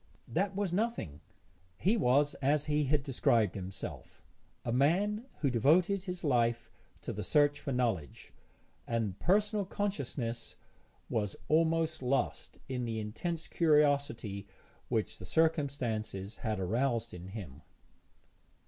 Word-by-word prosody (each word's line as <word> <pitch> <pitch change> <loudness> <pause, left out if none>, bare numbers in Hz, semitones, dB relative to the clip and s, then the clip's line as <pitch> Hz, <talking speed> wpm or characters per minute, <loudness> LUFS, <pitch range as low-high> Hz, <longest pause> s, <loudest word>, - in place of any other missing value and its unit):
That 190 +3 0
was 195 -3 -1
nothing; 185 - -1 0.6
he 205 +5 +2
was, 145 - +3
as 145 +2 +2
he 150 0 +1
had 145 0 +2
described 120 -6 +2
himself, 95 -1 -7 0.4
a 120 - -1
man 195 - +2
who 140 -3 +2
devoted 175 - +3
his 180 -2 -4
life 120 -5 +1 0.3
to - - -4
the - - -4
search 145 0 +3
for 145 - -4
knowledge, 115 - -2 0.5
and 110 -5 -1
personal 205 +2 +2
consciousness 140 - -3 0.5
was 105 -3 -1
almost 160 0 +2
lost 130 0 -1
in 125 -2 -2
the 115 -1 -2
intense 160 +11 -3
curiosity 140 - +2 0.4
which - - -1
the - - -9
circumstances 125 - 0
had 110 -4 -2
aroused 115 +4 0
in 90 +1 -8
him. 90 -9 -8
135 Hz, 120 wpm, -32 LUFS, 115-165 Hz, 0.6 s, was